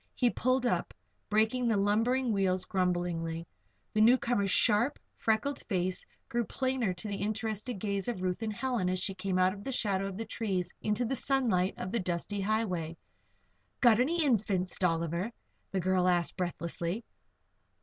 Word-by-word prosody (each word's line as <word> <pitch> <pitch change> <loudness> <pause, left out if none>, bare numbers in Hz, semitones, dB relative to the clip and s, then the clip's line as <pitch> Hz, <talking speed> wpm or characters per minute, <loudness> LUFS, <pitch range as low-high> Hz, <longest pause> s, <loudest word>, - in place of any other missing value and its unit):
He 245 -2 +3
pulled 255 0 +1
up, 240 - 0 0.3
braking 220 +4 +2
the 225 -3 +3
lumbering 225 +5 +2
wheels 185 -2 +1
grumblingly. 175 -3 -1 0.5
The 215 - +3
newcomer's 235 -3 +4
sharp, 235 +8 +3 0.2
freckled 225 +6 0
face 185 -2 -1 0.2
grew 240 0 0
plainer 260 -3 -1
to 175 +5 -7
the 200 -1 -3
interested 220 +2 -2
gaze 200 -1 -2
of 225 -7 -3
Ruth 185 +3 -1
and 220 -1 -1
Helen 230 -4 -1
as 185 - 0
she 190 +1 -1
came 190 0 -2
out 185 0 +4
of 200 0 -10
the 270 - -3
shadow 195 -5 0
of 195 -1 -6
the 225 - -3
trees 185 -7 -2
into 210 +3 0
the 270 - -1
sunlight 230 -10 +1
of 185 - -4
the 235 - 0
dusty 185 +3 -2
highway. 185 -6 -1 0.8
"Got 235 -3 +6
any 325 +6 +2
Infants, 200 -8 +1
Dolliver?" 170 +3 0 0.4
the 195 - -1
girl 185 0 +2
asked, 175 -4 +2
breathlessly. 175 +3 -2
205 Hz, 160 wpm, -31 LUFS, 185-235 Hz, 0.8 s, Got